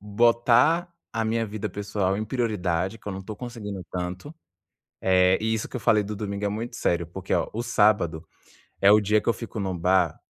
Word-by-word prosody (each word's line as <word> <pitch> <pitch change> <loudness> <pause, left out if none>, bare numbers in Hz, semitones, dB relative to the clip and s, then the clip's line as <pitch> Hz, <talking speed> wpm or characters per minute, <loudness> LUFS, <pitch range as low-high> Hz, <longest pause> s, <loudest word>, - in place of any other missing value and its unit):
botar 120 - +3 0.2
a 115 -1 -1
minha 115 0 0
vida 105 0 -4
pessoal 100 -1 -1
em 110 - -2
prioridade 105 -5 -1
que - - -26
eu - - -3
não 95 - -5
estou 105 +3 -7
conseguindo 105 -6 -6
tanto. 90 - -5 0.7
Eh, 95 0 +4
isso 110 0 -1
que - - -6
eu - - -5
falei 110 -2 +3
do 105 +1 -5
domingo 100 0 -4
é - - +2
muito 110 +4 -5
sério, 85 -1 0
porque 95 +2 -6
olha, - - 0
o 115 +2 -3
sábado 100 -8 +2 0.5
é 100 +1 +6
o 105 - +6
dia 105 +1 +2
que - - -5
eu - - +5
fico 115 -2 -6
no 95 -3 -2
bar, 90 -1 +2
105 Hz, 205 wpm, -25 LUFS, 95-115 Hz, 0.7 s, é